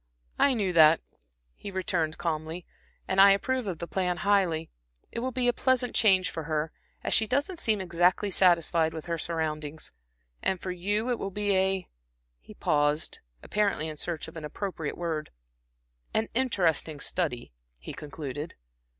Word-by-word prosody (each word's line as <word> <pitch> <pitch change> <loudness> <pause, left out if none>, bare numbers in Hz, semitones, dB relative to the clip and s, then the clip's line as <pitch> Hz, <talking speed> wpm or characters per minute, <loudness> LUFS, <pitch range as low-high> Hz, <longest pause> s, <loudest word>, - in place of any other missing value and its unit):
"I 275 -2 +4
knew 195 -5 0
that," 160 -1 +7 0.5
he 200 - -8
returned, 175 -4 -1
calmly, 165 +1 -3 0.4
"and 190 +1 +4
I 200 0 +9
approve 255 +3 -1
of 180 -4 -3
the 170 - -5
plan 180 0 -1
highly. 180 -6 +2 0.4
It - - -4
will 255 +2 -2
be 250 0 0
a 245 - +4
pleasant 255 0 +1
change 190 -4 +4
for 160 -2 -5
her, 155 0 -1 0.3
as - - 0
she 220 - +4
doesn't 285 - 0
seem 220 -9 +1
exactly 180 +2 +2
satisfied 170 -3 +3
with 160 - -6
her 170 -1 -2
surroundings; 155 -2 -3 0.5
and 190 - 0
for 185 - -4
you 205 +7 -1
it 240 - -1
will 195 - -3
be 205 +1 -1
a - - +5
a" 190 -1 0 0.5
he - - -14
paused, 145 +1 +1 0.2
apparently 200 -7 0
in 155 - -5
search 165 +1 -4
of - - -11
an 160 - -7
appropriate 160 -1 -4
word 165 -3 -3 0.9
"an 220 0 +1
interesting 175 - +1
study," 140 - -2 0.3
he - - -8
concluded. 145 0 -6
175 Hz, 165 wpm, -28 LUFS, 160-205 Hz, 0.9 s, I